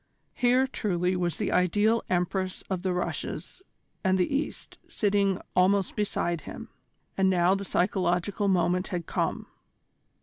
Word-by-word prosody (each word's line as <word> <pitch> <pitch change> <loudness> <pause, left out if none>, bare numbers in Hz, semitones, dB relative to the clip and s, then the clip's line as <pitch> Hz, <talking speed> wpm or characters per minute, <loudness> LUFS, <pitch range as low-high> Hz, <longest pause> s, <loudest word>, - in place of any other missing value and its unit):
Here, 250 +2 +3
truly, 185 -8 -1
was 175 -2 -1
the - - -1
ideal 205 +6 +3
Empress 185 +1 -1
of 185 -2 -1
the 190 0 0
Russias 180 - -4 0.4
and 190 -1 +3
the 185 +10 +1
East 290 - -4
sitting 200 -2 +1 0.2
almost 190 +1 +3
beside 175 -5 -1
him. - - -9 0.5
And 190 0 +4
now 180 0 +3
the 200 0 -2
psychological 185 +2 0
moment 180 0 +2
had 175 -4 -3
come! - - -2
190 Hz, 135 wpm, -27 LUFS, 180-200 Hz, 0.5 s, And